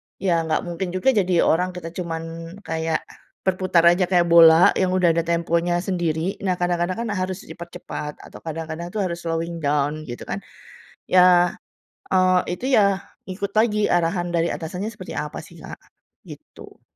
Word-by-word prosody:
ya 170 -4 0
nggak 155 - 0
mungkin 175 +1 -4
juga 185 +8 +3
jadi 185 -7 +2
orang 180 +2 +1
kita 165 -2 -7
cuman 165 0 -6
kayak 160 -2 -2 0.4
berputar 185 -2 +2
aja 180 +1 +3
kayak 175 -1 +2
bola 165 0 +8
yang 185 -1 +1
udah 185 -2 +3
ada 165 - +1
temponya 170 +1 0
sendiri. 175 -1 -2
Nah, 185 - +2
kadang-kadang 175 0 0
kan 235 - -3
harus 185 -2 -3
dipercepat 170 -4 -8
atau - - -12
kadang-kadang 165 +2 -5
tuh 215 - -1
harus 175 -3 -2
slowing 165 +1 -2
down, 150 0 -1
gitu 120 -3 -8
kan. - - -2 0.7
Ya, 180 -1 +5 0.6
eee, 185 -1 +4 0.2
itu 255 - -4
ya, 200 -2 +3 0.2
ikut 195 +2 -5
lagi 215 -1 +2
arahan 175 0 0
dari 170 0 +1
atasannya 180 +6 -4
seperti 220 - -9
apa - - -4
sih, - - -15
Kak, - - -9 0.5
gitu. - - -13
175 Hz, 160 wpm, -22 LUFS, 165-185 Hz, 0.7 s, bola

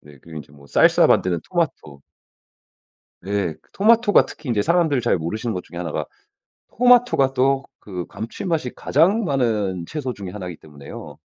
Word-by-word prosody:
네. 75 -2 -17
그리고 80 -1 -12
인제 70 -1 -12
뭐 70 -1 -17
살사 - - +4
만드는 90 -3 +2
토마토. 145 - -3 1.2
예. 100 -5 -1
그 - - -34
토마토가 225 +1 +4
특히 150 -4 -11
인제 105 -4 +1
사람들 165 -6 +2
잘 120 - +1
모르시는 110 +8 -3
것 90 - -4
중에 85 - -10
1 85 -3 -4
가 - - -3 0.7
토마토가 245 - +4
또 135 +1 +2 0.2
그 90 -4 -6
감칠맛이 130 - -4
가장 195 +9 +2
많은 105 - -1
채소 140 - -4
중에 95 -4 -8
1 95 -3 -7
기 85 - -7
때문에요. 70 -2 -11
115 Hz, 315 characters per minute, -21 LUFS, -, 1.2 s, 살사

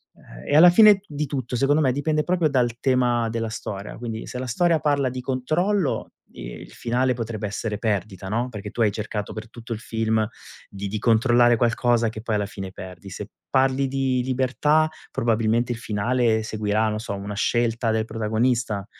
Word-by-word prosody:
Ehm, - - -14
e - - +1
alla 175 +2 +9
fine 210 +1 +7
di 150 0 -3
tutto, 130 -3 -3
secondo 145 +4 +3
me, 130 -3 +3
dipende 150 +2 0
proprio 175 -4 +1
dal 120 -3 +1
tema 120 -3 +2
della 115 -1 -2
storia, 100 -2 -6
quindi 115 -1 -6
se 125 - -6
la 130 - -3
storia 165 +6 +2
parla 140 -3 +1
di 125 0 -5
controllo 155 +8 0 0.2
i - - -9 0.2
il - - -14
finale 125 +2 0
potrebbe 110 -3 -4
essere 105 +1 -3
perdita, 100 -3 -2
no, 120 +4 -1
perché 105 -2 -7
tu 120 - -3
hai 105 -2 +4
cercato 105 0 -4
per 110 +1 -8
tutto 120 0 -11
il 110 - -6
film 110 -2 0 0.4
di 100 0 -6
di 105 +1 -3
controllare 120 +1 +4
qualcosa, 120 -1 +2
che 110 0 -8
poi 110 -2 -1
alla 105 -1 0
fine 95 -2 -7
perdi. 95 0 -10
Se 100 +2 -7 0.2
parli 135 0 +2
di 130 -1 0
libertà, 130 +5 +2 0.2
probabilmente 115 +1 +1
il - - -7
finale 110 +1 +1
seguirà, 110 0 0
non 105 0 -2
so, 110 -2 -5
una 100 +1 -6
scelta 115 +1 +1
del 110 0 +1
protagonista. 110 -2 -1
115 Hz, 185 wpm, -23 LUFS, 110-130 Hz, 0.4 s, alla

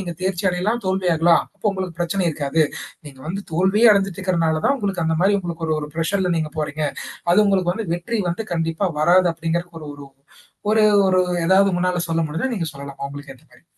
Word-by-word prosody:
நீங்க 175 -3 -5
தேர்ச்சி 190 0 -1
அடையலாம், 210 +7 -1
தோல்வியாகலாம். 175 -3 +3
அப்போ - - -5
உங்களுக்கு 185 -3 -5
பிரச்சனை 175 +2 0
இருக்காது. 150 +1 0 0.4
நீங்க 135 -2 -12
வந்து 195 +3 -3
தோல்வியே 190 +7 +4
அடைஞ்சிட்டு 195 -2 -1
இருக்கிறனால 165 -4 0
தான் 280 - +2
உங்களுக்கு 200 - +1
அந்த 160 0 +1
மாரி 195 +3 +3
உங்களுக்கு 170 -3 -5
ஒரு 155 - +1
ஒரு 150 - -5
பிர்ஷர்ல 180 +3 0
நீங்க 155 -1 -1
போறீங்க. 155 0 -3 0.5
அது 180 - +4
உங்களுக்கு 185 -3 +2
வந்து 220 +1 -5
வெற்றி 215 +7 -2
வந்து 175 +6 -2
கண்டிப்பா 165 +2 -1 0.2
வராது 175 +3 +5
அப்படிங்கறக்கு 170 +1 -3
ஒரு 150 - -9
ஒரு 145 -1 -11 0.6
ஒரு 220 0 +4 0.3
ஒரு 185 0 +3 0.3
ஏதாவது 195 +2 +5
உங்கனால 180 0 0
சொல்ல 165 0 0
முடிஞ்சா 165 - -2
நீங்க 165 -6 -3
சொல்லலாம், 140 0 -9
அவங்களுக்கு 140 -1 -8
ஏத்த 155 - -26
மாரி. 125 +6 -22
175 Hz, 190 wpm, -21 LUFS, 160-190 Hz, 0.6 s, வராது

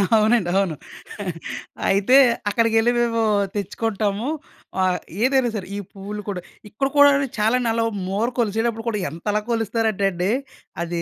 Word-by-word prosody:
అవునండి. 215 -3 +3
అవును. 190 -5 +1 1.1
అయితే 200 +7 +5 0.3
అక్కడికెళ్ళి 225 +2 +3
మేము 230 -1 +1 0.3
తెచ్చుకుంటాము. 205 +2 -2 0.6
ఆహ్, 185 -1 +1 0.2
ఏదైనా 260 -1 +3
సరే 190 -4 -4
ఈ - - -3
పువ్వులు 205 +1 -6
కూడా 185 -3 -3 0.3
ఇక్కడ 270 +7 -1
కూడా 285 0 +9
అండి 275 0 +1
చాలనలో 230 +1 +2 0.2
మూర 200 +5 0
కొలిసేటప్పుడు 225 +1 0
కూడా 210 -2 -2
ఎంతలా 205 +7 -2
కొలుస్తారంటే 225 -2 0
అండి. 180 +3 -1 0.5
అది 170 0 -3
215 Hz, 125 wpm, -22 LUFS, 195-230 Hz, 1.1 s, కూడా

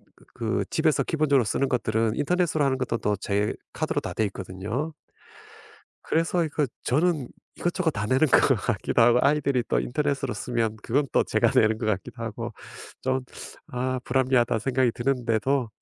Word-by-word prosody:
그 - - -22
그 115 -1 -1
집에서 160 -2 +2
기본적으로 145 -6 +2
쓰는 135 +5 0
것들은 110 -2 0
인터넷으로 160 -1 +1
하는 130 -1 +1
것도 130 -2 -1
또 105 0 0
제 100 +1 -1 0.2
카드로 - - -1
다 - - -5
되어 110 - +1
있거든요. 100 - -5 1.1
그래서 165 +1 +1
이거 150 -1 0 0.2
저는 150 -1 +1 0.3
이것저것 175 -1 0
다 105 -5 -3
내는 130 +6 +3
것 135 - +5
같기도 115 +1 0
하고 120 +1 +5
아이들이 140 -3 +2
또 - - +2
인터넷으로 140 -1 -1
쓰면 115 0 -2
그건 140 +4 +1
또 - - +3
제가 - - +2
내는 110 0 +4
것 110 - -3
같기도 110 +3 -3
하고 115 +1 -5 0.5
좀 130 0 0 0.5
'아 130 +1 -1
불합리하다.' 125 -3 +2
생각이 125 0 +1
드는데도 125 0 0
125 Hz, 360 characters per minute, -26 LUFS, 115-145 Hz, 1.1 s, 것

